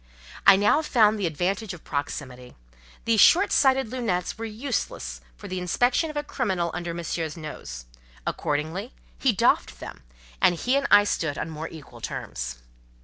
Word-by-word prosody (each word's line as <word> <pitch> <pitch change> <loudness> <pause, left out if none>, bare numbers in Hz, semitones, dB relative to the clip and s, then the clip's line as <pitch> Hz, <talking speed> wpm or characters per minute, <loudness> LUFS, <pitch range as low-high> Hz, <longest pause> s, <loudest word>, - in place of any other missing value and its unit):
I 200 - +10
now 205 +10 +3
found 220 -8 +3
the 190 - +1
advantage 185 +6 -2
of 165 - -15
proximity: 130 -3 -5 0.5
these 225 -2 +4
short 380 +4 +6
sighted 265 -3 +3
"lunettes" 220 -9 -1
were 225 - -5
useless 215 - -4 0.2
for - - -9
the 185 0 -3
inspection 245 - +1
of 305 - -6
a 295 - -1
criminal 190 - -1
under 175 -1 -4
Monsieur's 165 -1 -4
nose; 60 - -8 0.4
accordingly, 155 - -2 0.3
he - - +3
doffed - - +1
them, - - -9 0.4
and 175 - +5
he 250 +10 0
and 280 0 +1
I 205 - +8
stood 160 -7 -1
on 160 - -4
more 155 +1 -5
equal 140 -8 -12
terms. - - -5
180 Hz, 160 wpm, -25 LUFS, 150-230 Hz, 0.5 s, I